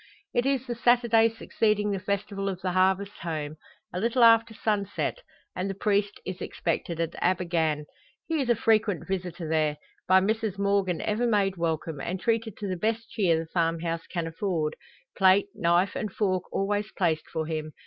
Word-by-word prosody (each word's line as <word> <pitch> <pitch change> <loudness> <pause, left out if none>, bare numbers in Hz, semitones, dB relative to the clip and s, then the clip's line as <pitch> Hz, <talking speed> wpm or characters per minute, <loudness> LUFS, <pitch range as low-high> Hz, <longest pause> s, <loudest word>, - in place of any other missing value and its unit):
It 245 +2 +2
is 270 -2 +1
the 245 - -3
Saturday 235 -1 +4
succeeding 210 -2 0
the 195 - -1
festival 200 0 -2
of 185 -2 -4
the 185 -1 -1
Harvest 190 +2 +1
Home, 155 -2 -4 0.4
a 180 - -2
little 235 +4 +2
after 230 0 +6
sunset, 210 - -1 0.4
and 185 +2 -2
the 195 - -3
priest 205 0 0
is 185 -1 -5
expected 165 0 -2
at 165 0 -1
Abergann. 170 -4 +1 0.4
He 320 -3 0
is 255 - -2
a 240 - +5
frequent 215 -4 +1
visitor 180 -3 -3
there; 155 -2 +1 0.3
by 185 +1 +6
Mrs 215 0 -1
Morgan 200 -3 +1
ever 220 +3 0
made 200 -4 +2
welcome, 160 -3 -2
and 185 +5 -3
treated 225 0 -1
to 205 - -4
the 185 -1 -2
best 225 +4 -2
cheer 180 -7 +2
the 165 - -3
farm 165 0 0
house 165 -1 -3
can 170 -2 -3
afford; 165 -2 -2 0.4
plate, 195 +1 +4
knife, 175 +3 +2
and 215 - -3
fork 185 -3 -1
always 205 +2 -1
placed 165 -5 0
for 160 -1 -2
him. 155 -1 -4
195 Hz, 180 wpm, -27 LUFS, 170-215 Hz, 0.4 s, after